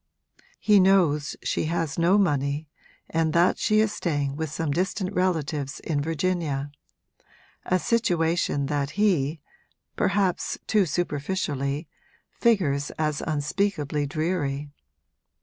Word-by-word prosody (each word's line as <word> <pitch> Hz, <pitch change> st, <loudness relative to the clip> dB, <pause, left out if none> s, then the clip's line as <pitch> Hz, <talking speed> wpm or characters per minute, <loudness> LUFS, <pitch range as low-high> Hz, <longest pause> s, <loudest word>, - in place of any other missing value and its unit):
He 210 Hz, -2 st, +5 dB
knows 175 Hz, -7 st, +3 dB
she -, -, -1 dB
has 165 Hz, -1 st, -2 dB
no 175 Hz, +4 st, +4 dB
money 145 Hz, -5 st, 0 dB, 0.4 s
and 160 Hz, -1 st, 0 dB
that 170 Hz, +2 st, +3 dB
she 215 Hz, 0 st, +3 dB
is 215 Hz, -1 st, +1 dB
staying 145 Hz, -5 st, -1 dB
with 160 Hz, 0 st, -3 dB
some 155 Hz, +1 st, -2 dB
distant 185 Hz, +4 st, -1 dB
relatives 155 Hz, -6 st, -1 dB
in 145 Hz, -3 st, -1 dB
Virginia; 160 Hz, -3 st, -1 dB, 1.0 s
a 185 Hz, -, +3 dB
situation 170 Hz, -9 st, +1 dB
that 140 Hz, -1 st, -1 dB
he 160 Hz, -8 st, +1 dB, 0.5 s
perhaps 195 Hz, -2 st, 0 dB
too 205 Hz, -4 st, +2 dB
superficially 145 Hz, -2 st, -2 dB, 0.5 s
figures 155 Hz, -, +2 dB
as 155 Hz, -2 st, -1 dB
unspeakably 150 Hz, -1 st, -1 dB
dreary. 145 Hz, -2 st, -2 dB
160 Hz, 110 wpm, -25 LUFS, 145-185 Hz, 1.0 s, He